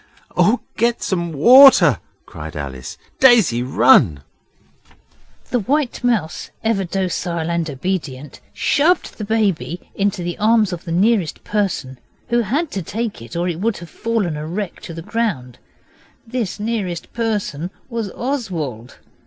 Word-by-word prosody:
'Oh, 235 +4 +3 0.2
get 235 +1 +1
some 170 -3 -1
water!' 175 - +7 0.3
said 75 +1 -8
Alice. 65 -3 -6 0.2
'Daisy, 225 - +5
run!' 115 - +4 1.3
The 245 - +2
White 265 +4 -1
Mouse, 215 -10 -1
ever 220 -3 +1
docile 175 -2 -2
and 170 -1 -1
obedient, 145 -2 -4
shoved 330 0 +1
the - - -3
baby 200 -5 -1
into 200 -3 -1
the 175 0 -4
arms 215 -2 +3
of 175 - -7
the 165 - -5
nearest 190 -1 +1
person, 190 -11 -2 0.3
who 240 0 +3
had 280 - -1
to 195 - -3
take 220 - -4
it 115 0 -10
or 175 +1 0
it 170 -2 -3
would 220 +2 0
have 175 -2 -11
fallen 225 -8 -1
a 150 +1 -5
wreck 185 +2 -4
to 165 - -8
the 165 - -7
ground. 175 - -2 0.7
This 225 -4 -3
nearest 205 -6 -3
person 205 -8 -2 0.2
was 230 -4 -3
Oswald. 175 - -4
190 Hz, 140 wpm, -19 LUFS, 160-230 Hz, 1.3 s, water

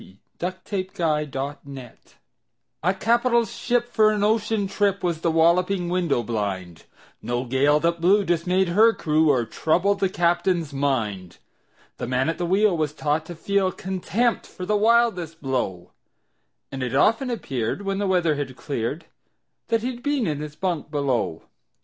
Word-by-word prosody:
Y - - -16
Z 95 - -18
A 135 - -9
Nautical 185 -4 -2
Ballad 135 -2 -7 0.8
A 180 - +2
CAPITAL 235 +3 +2
ship 240 +1 -1
for 220 -3 +3
an 210 -1 0
ocean 215 -1 +1
trip 200 0 0
Was 170 -3 -1
The 170 - +1
Walloping 175 +3 +2
Window 175 -9 0
blind 95 -7 -4 0.4
No 120 +1 -2
gale 140 +4 +3
that 170 0 0
blew 195 +4 +4
dismayed 180 +2 +1
her 220 +6 +5
crew 155 -3 +2
Or 125 -5 +2
troubled 180 - +1
the 195 - +1
captain's 175 -3 0
mind. 110 -11 -2 0.6
The - - -4
man 130 +4 +1
at 165 - -3
the 175 - -1
wheel 195 +1 +3
was 155 -2 -1
taught 155 +1 -1
to 175 - -7
feel 195 +2 0
Contempt 190 +6 -1
for 185 - -8
the 210 - +1
wildest 210 -7 +2
blow, 120 - -3 0.8
And 135 - -5
it 125 0 -2
often 230 - +3
appeared, 135 - -3
when 195 0 -2
the 205 - 0
weather 175 -4 +2
had 140 -3 -4
cleared, 140 +5 -4 0.6
That 230 -1 0
he'd 245 -1 -4
been 285 -4 0
in 150 -3 -2
his 150 0 -7
bunk 175 -5 -2
below. 135 - -1
170 Hz, 160 wpm, -24 LUFS, 140-200 Hz, 0.8 s, her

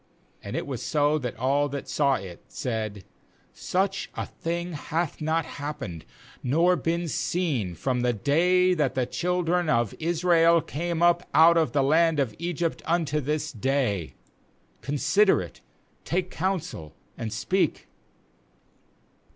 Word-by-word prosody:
30And - - -6
it - - -2
was - - -5
so, 150 0 +1
that 125 -4 -5
all 140 +4 +1
that 140 0 -5
saw 140 -2 +2
it 95 -7 -8
said: 110 -5 -4 0.5
'Such 195 +1 -1
a - - -3
thing 170 +1 -4
hath 160 +2 -3
not 160 +1 0
happened 145 - -6 0.4
nor 165 +8 +3
been 170 0 -1
seen 140 - -1
from 125 +7 -1
the 125 0 +2
day 180 - +3
that 145 -6 0
the 130 -1 +1
children 175 +3 0
of 115 -4 +1
Israel 170 0 +4
came 170 +2 -2
up 175 0 +3
out 165 +1 +7
of 165 -2 +2
the 140 -2 +3
land 160 +2 +3
of 130 -6 0
Egypt 170 -1 -2
unto 160 -3 +1
this 150 +2 -2
day; 120 - -1 0.7
consider 150 +8 +3
it, 90 -2 -8 0.4
take 180 +1 -2
counsel, 175 - -3 0.2
and 110 -2 -5
speak.' 190 - 0
155 Hz, 135 wpm, -26 LUFS, 130-170 Hz, 0.7 s, out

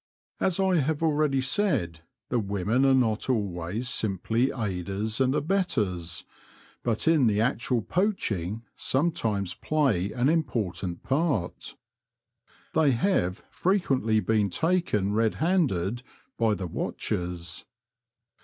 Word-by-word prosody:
As 190 -1 +1
I 190 -2 +3
have 155 +1 0
already 150 -3 +2
said, 130 - 0 0.3
the 125 - +1
women 100 +5 +1
are 135 - +5
not 115 -2 +1
always 100 -1 -1
simply 110 +3 +1
aiders 105 +1 -3
and 130 +1 +3
abettors, 105 - -1 0.6
but 115 +4 -1
in 155 -6 +5
the 105 -1 +2
actual 120 0 0
poaching 115 - -1
sometimes 110 - 0
play 120 - 0
an 125 +1 +1
important 115 - -1
part. 135 - -1 1.0
They 150 -4 +4
have 115 - 0
frequently 135 - +1
been 105 -3 +1
taken 135 - +1
red 110 0 +2
handed 125 - +1 0.3
by 110 -2 +2
the 95 -1 -4
watchers. 85 0 -4
115 Hz, 110 wpm, -27 LUFS, 100-150 Hz, 1.0 s, are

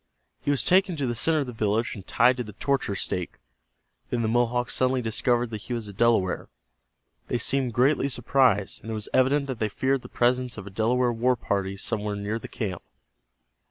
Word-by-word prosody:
He - - -3
was 145 -2 +2
taken 185 -1 +3
to 145 -3 -2
the 120 - -1
center 155 +6 +2
of - - -2
the 125 - -7
village 110 +1 0
and 95 -3 -10
tied 125 +2 +4
to 125 - -2
the 105 -2 -10
torture 135 -2 -1
stake. 90 -2 -3 0.7
Then 120 -1 -1
the - - +1
Mohawks 120 +1 +1
suddenly 130 -1 +1
discovered 120 +1 0
that 110 -2 -5
he 125 - -5
was 115 -3 -4
a 100 - -8
Delaware. 105 -4 +1 0.8
They - - 0
seemed 125 +1 +1
greatly 135 +2 +3
surprised, 120 -5 +2
and 115 - -9
it 110 - -2
was 105 -1 -5
evident 135 +2 +3
that 130 -4 -5
they 110 - 0
feared 130 +5 0
the - - -11
presence 125 0 +1
of 100 - -7
a 100 - -9
Delaware 120 +4 +1
war 125 +2 +2
party 100 -3 -2
somewhere 105 0 -2
near 100 +2 -3
the - - -8
camp. 95 -6 -4
120 Hz, 205 wpm, -26 LUFS, 105-130 Hz, 0.8 s, tied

